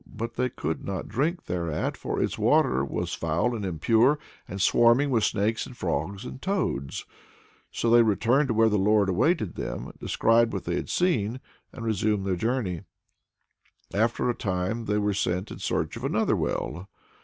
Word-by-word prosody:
But 115 +2 -5
they 125 +1 0
could 80 -7 -4
not 95 -3 -4
drink 155 - -1
thereat, 85 -3 -2
for - - -3
its - - 0
water 65 +1 +3
was 70 - -3
foul 85 +10 0
and 105 - -4
impure, 110 - +3 0.3
and 95 - -6
swarming 120 +8 +4
with 115 -4 +2
snakes 110 +2 0
and 125 - -12
frogs 90 +3 -2
and 130 - -8
toads. 185 - -2 0.6
So - - -2
they 120 0 +7
returned 115 +6 +3
to 115 - -1
where 115 +1 +5
the 105 -2 +2
Lord 105 0 +3
awaited 110 - +1
them, - - -5
described 115 +1 +2
what 95 - -3
they 85 - -2
had - - -4
seen, 125 - +1 0.3
and 115 - -7
resumed 105 -2 0
their 95 -2 0
journey. 110 -4 -1 1.1
After 115 +5 +1
a 120 - +2
time 105 +1 -2
they 105 0 0
were 105 -1 +1
sent 95 0 -1
in - - -8
search - - -1
of - - -8
another - - +1
well. 90 +6 -3
110 Hz, 175 wpm, -26 LUFS, 95-120 Hz, 1.1 s, they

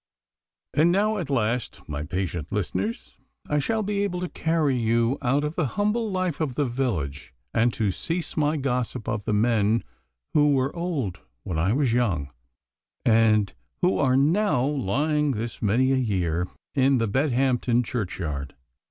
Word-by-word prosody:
And 155 +5 +4
now 210 +3 +2
at 165 -6 -4
last, 120 -2 -1
my 75 -1 -4
patient 85 0 -3
listeners, 105 +1 -3 0.3
I 150 - +1
shall 220 +9 0
be 200 0 -1
able 180 -3 -2
to 180 - -3
carry 160 -4 +1
you 115 +2 +1
out 140 +2 +1
of 150 +1 -2
the 165 -4 0
humble 210 +2 +1
life 185 -5 -1
of 140 -6 -1
the 145 - +1
village, 90 - -3 0.2
and 115 +2 +3
to 105 -3 0
cease 165 - -3
my 150 0 +1
gossip 125 -3 -2
of 105 -2 -2
the 110 - 0
men 110 0 +2 0.5
who 145 -1 +4
were 135 +3 0
old 145 - -2 0.2
when 90 -6 -2
I 95 +6 +2
was 130 -3 +2
young, 90 - 0 0.7
and 110 -4 +4 0.3
who 180 - +3
are 130 -2 +3
now 155 -1 +3
lying 145 +3 +1
this 115 +1 -5
many 120 +5 +3
a 135 - +3
year 90 -8 0 0.3
in 135 0 +3
the 115 -1 +1
Bedhampton 125 -1 +2
churchyard. 85 - -4
125 Hz, 160 wpm, -25 LUFS, 105-150 Hz, 0.7 s, And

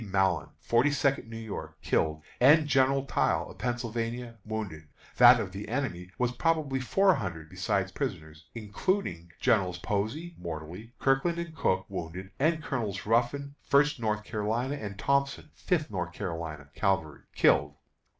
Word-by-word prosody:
Mallon, 95 -2 +1
Forty 120 +5 +3
second 140 -4 +1
New 115 - -7
York, 80 -8 -7
killed, 80 -1 0 0.2
and 150 +5 +7
General 135 -1 +3
Tile, - - 0
of - - -15
Pennsylvania, 120 -1 -3
wounded; 105 -8 -5 0.3
that - - +9
of - - -3
the - - -7
enemy 90 +1 -2
was 125 -1 +1
probably 150 -1 0
four 190 +9 +4
hundred 85 - -5
(besides 95 +1 -1
prisoners), 80 - -5
including 105 - -2
Generals 95 -8 +2
Posey 110 - -2
(mortally), 85 +7 -7
Kirkland, 135 +6 +2
and 170 -2 -5
Cooke, 95 -8 +1
wounded, 95 +1 -6
and 155 +2 +2
Colonels 110 -9 -3
Ruffin, 125 +6 +1
First 145 -1 +3
North 105 -2 -1
Carolina, 110 +5 -1
and 100 -7 -6
Thompson, 140 +5 0
Fifth 160 - -1
North 90 -3 -3
Carolina 80 -6 -5
Cavalry, 90 -7 0 0.2
killed." - - +3
110 Hz, 140 wpm, -29 LUFS, 95-135 Hz, 0.3 s, that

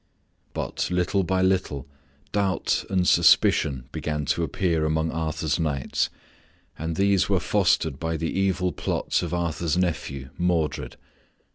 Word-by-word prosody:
But - - -2
little 90 +2 +1
by 95 +1 +1
little 90 -8 0 0.4
doubt 100 -3 0
and 90 -2 +1
suspicion 70 -5 +4
began 75 -1 -3
to - - -3
appear 85 +1 0
among 80 +1 0
Arthur's 80 -1 -1
knights, 75 -5 0 0.7
and 80 +1 -4
these 100 0 +2
were - - +3
fostered 75 -5 +1
by 80 0 -2
the 80 +1 -2
evil 95 -1 +1
plots - - -1
of - - -4
Arthur's 85 -2 -1
nephew, 75 -7 -2
Modred. 75 -7 0
80 Hz, 130 wpm, -25 LUFS, 75-90 Hz, 0.7 s, suspicion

